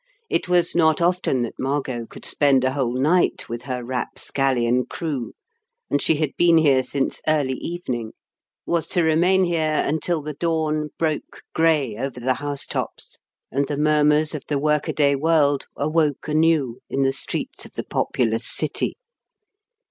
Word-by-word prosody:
It - - 0
was 180 -1 +3
not 160 -2 +3
often 175 -7 +1
that 120 - -5
Margot 130 -4 -2
could - - -8
spend 140 -3 +3
a 130 0 +1
whole 130 -3 -1
night 170 +6 +2
with 120 +1 -5
her 125 -2 -4
rapscallion 125 0 0
crew, 145 -8 -4 0.6
and 145 - +2
she 160 - +3
had 150 -2 -1
been 170 -1 +5
here 140 -5 +4
since 135 +1 -2
early 145 -4 +2
evening 125 -10 -4 0.5
was 170 -2 0
to 175 - +1
remain 175 +4 +3
here 160 -3 +1
until 160 +1 -1
the 150 +1 -5
dawn 155 -1 -1
broke 155 -2 -3
grey 150 -9 +2
over 130 +1 -4
the 130 +2 +1
house 145 +1 -1
tops - - -5 0.3
and 140 +2 0
the 145 - -3
murmurs 150 +1 +3
of 150 - -4
the 145 - 0
workaday 150 0 +1
world 145 -1 +2
awoke 150 -1 0
anew 155 -5 +2
in 135 - 0
the 135 0 +2
streets - - -3
of - - -22
the - - -4
populous 115 -1 -1
city. - - -1
145 Hz, 155 wpm, -22 LUFS, 130-160 Hz, 0.6 s, been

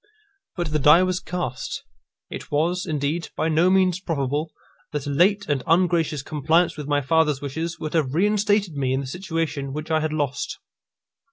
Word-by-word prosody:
But 175 -3 -2
the 155 - +1
die 150 +6 +6
was 185 -1 0
cast. 175 -10 -4 0.5
It - - -7
was, 175 +6 0
indeed, 155 +2 -2
by 160 - 0
no 165 +3 +3
means 185 -1 +3
probable 150 -3 -2 0.4
that 145 -2 -3
a 145 - -2
late 200 +7 +3
and 145 -3 0
ungracious 165 -4 +2
compliance 160 +4 +1
with 150 -2 -6
my 145 -1 +1
father's 150 0 +2
wishes 160 +5 -4
would 155 - -5
have 150 -4 0
reinstated 205 0 +2
me 135 -2 -1
in 135 - 0
the - - -6
situation 160 -3 -3
which 155 +2 -5
I 160 - +3
had 155 0 -1
lost. 145 -3 -2
155 Hz, 175 wpm, -23 LUFS, 145-175 Hz, 0.5 s, die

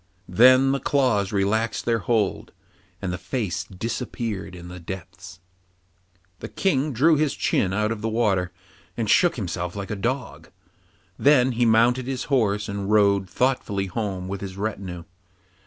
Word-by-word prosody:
Then 130 +7 +6
the 140 - 0
claws 125 -10 +1
relaxed 110 +3 0
their 115 -1 +1
hold, 105 0 -1 0.5
and 90 -2 -2
the 90 - -5
face 100 0 -3
disappeared 105 -1 -5
in 90 0 -10
the 90 0 -9
depths. 85 0 -9 1.0
The - - -6
King 150 -6 0
drew 150 +6 +4
his 150 -2 0
chin 95 - 0
out 105 +2 0
of 110 -2 -4
the 115 - -1
water, 100 -6 +1 0.5
and 115 -2 -1
shook 175 - +4
himself 90 -5 -4
like 100 0 -5
a - - -1
dog; 125 +6 -4 0.7
then 130 -3 +4
he 120 0 +1
mounted 120 +3 +3
his 130 -1 -3
horse 105 -5 +1
and 100 -1 -4
rode 100 -3 +3
thoughtfully 125 -7 0
home 95 -2 -4
with 100 0 -5
his 95 -1 -7
retinue. 95 -4 -4
105 Hz, 155 wpm, -24 LUFS, 95-125 Hz, 1.0 s, Then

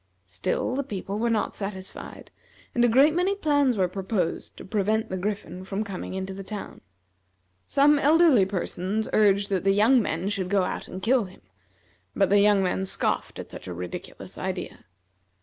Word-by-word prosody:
Still 95 - -2
the 275 - 0
people 200 -4 -5
were 235 +1 +1
not 225 -2 0
satisfied, 195 -2 -7 0.4
and 240 - +2
a - - +6
great 270 +6 +5
many 365 +4 +1
plans 285 - +2
were 185 -2 +2
proposed 190 -1 -3
to - - -9
prevent 215 +2 0
the - - -3
Griffin 185 -2 -4
from 195 +2 -3
coming 195 -2 -6
into 190 0 -4
the 195 +1 -7
town. 205 +1 -7 0.9
Some 290 +1 +4
elderly 295 - +5
persons 195 +2 -2
urged 200 -1 +3
that 190 -3 0
the 195 0 +3
young 230 +5 +5
men 175 -2 -2
should 190 -3 -2
go 200 -1 +3
out - - -4
and 185 +1 -8
kill 240 -1 +3
him; 185 - -15 0.7
but 195 -1 +2
the 205 - +6
young 205 -1 +4
men 185 +1 0
scoffed - - -1
at - - -8
such - - -9
a 90 - -5
ridiculous 90 0 -7
idea. - - -5
200 Hz, 180 wpm, -26 LUFS, 190-235 Hz, 0.9 s, a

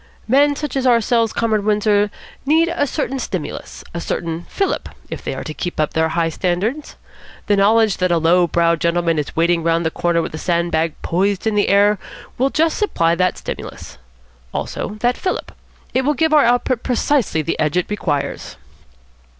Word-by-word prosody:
Men 285 +4 +4
such 295 -2 -4
as 265 -1 +1
ourselves, 230 -1 +3
Comrade 220 -3 0
Windsor, 210 0 +2 0.3
need 320 +4 +3
a 290 - 0
certain 270 -2 -2
stimulus, 185 -9 -5
a 170 - -4
certain 165 0 -4
fillip, 390 -1 -1 0.2
if - - -6
they - - -3
are - - -5
to 155 - -6
keep 175 +2 -5
up 155 - 0
their 160 0 +1
high 165 0 0
standards. 195 - -2 0.5
The 205 - +3
knowledge 215 +1 +3
that 185 0 +1
a 170 - +3
low 170 +2 +3
browed 170 0 +1
gentleman 170 -1 +1
is 150 - -5
waiting 170 +1 +2
round 165 0 +1
the 160 - +1
corner 170 0 0
with - - -6
a 155 - -5
sand 170 -1 0
bag 160 0 0
poised 195 +3 0
in 220 -1 +1
air 205 0 +3 0.4
will 265 +2 +3
just 320 +3 +1
supply 170 - +2
that 180 +1 +1
stimulus. - - -8 0.6
Also 210 - -4
that 245 +1 +2
fillip. 370 - -3 0.4
It 260 - +2
will 295 +3 +1
give 320 0 +1
our 300 -4 +6
output 245 0 +1
precisely 245 - +1
the 165 - -3
edge 155 +2 +1
it 180 - +2
requires." 145 -9 -3
200 Hz, 185 wpm, -19 LUFS, 170-245 Hz, 0.6 s, our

